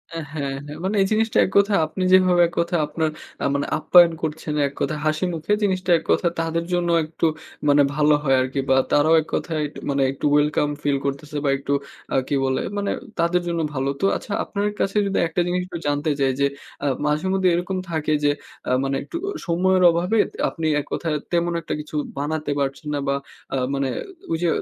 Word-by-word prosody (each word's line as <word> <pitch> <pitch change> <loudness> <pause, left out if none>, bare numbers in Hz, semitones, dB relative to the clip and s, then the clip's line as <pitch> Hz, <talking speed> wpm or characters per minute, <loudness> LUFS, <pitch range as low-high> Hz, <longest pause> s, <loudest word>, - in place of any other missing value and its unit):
আ - - -3 0.2
হ্যাঁ, 140 -3 -3
হ্যাঁ, 150 +1 -8
মানে 195 +3 -1
এই 195 - +3
জিনিসটা 220 +1 +1
এক - - -5
কথায় 200 0 +4
আপনি 185 +4 -4
যেভাবে 185 -1 +5
এক 170 - -12
কথায় 170 -1 +1
আপনার 160 0 -1 0.3
আ - - +1
মানে 140 - 0
আপ্যায়ন 170 +2 +6
করছেন, 155 0 -3
এক 140 - -8
কথায় 155 -1 -1
হাসিমুখে 165 +3 0
জিনিসটা 185 -2 0
এক - - -15
কথায় 170 - +2
তাদের 165 +1 -1
জন্য 175 -1 +1 0.2
একটু 160 +2 -2 0.4
মানে 145 0 +6
ভালো 150 0 +4
হয় 135 -2 +3
আরকি 130 +2 -2
বা 135 - +5 0.2
তারাও 155 +3 +5
এক 155 - -11
কথায় 160 -2 -2
এক - - -14 0.2
মানে 140 0 +1
একটু 135 - -5
welcome 150 0 +2
feel 145 -1 +2
করতেছে 145 +2 -3
বা, - - +3
একটু 140 +1 -2 0.4
আ - - +3
কি 145 - 0
বলে? 130 0 0 0.2
মানে 200 0 -1 0.3
তাদের 170 +1 +2
জন্য 170 -1 -1
ভালো। 135 0 -1
তো - - +3
আচ্ছা, 205 - -7
আপনার 205 0 -2
কাছে 195 +2 0
যদি 195 - -1
একটা 165 +2 -1
জিনিস 180 +1 0
একটু 175 -2 -6
জানতে 145 +1 0
চাই 135 -1 +3
যে, 140 - +4 0.4
আ - - +2 0.2
মাঝেমধ্যে 185 +5 +1
এরকম 180 +2 -2
থাকে 155 -1 0
যে 145 - +4 0.4
আ - - +1
মানে 135 0 -1
একটু 335 - -6
অ - - -2 0.2
সময়ের 185 +2 +2
অভাবে 180 +6 0 0.3
আপনি 165 - -5
এক 145 - -5
কথায় 160 -3 -1 0.2
তেমন 170 0 +1
একটা - - -4
কিছু 150 0 -8 0.2
বানাতে 150 +1 -2
পারছে 135 +1 -2
না 145 - -1
বা 140 - +2 0.4
আ - - +1 0.2
মানে 135 -1 0 0.4
ওইযে 165 +1 0
160 Hz, 205 wpm, -22 LUFS, 145-180 Hz, 0.4 s, আপ্যায়ন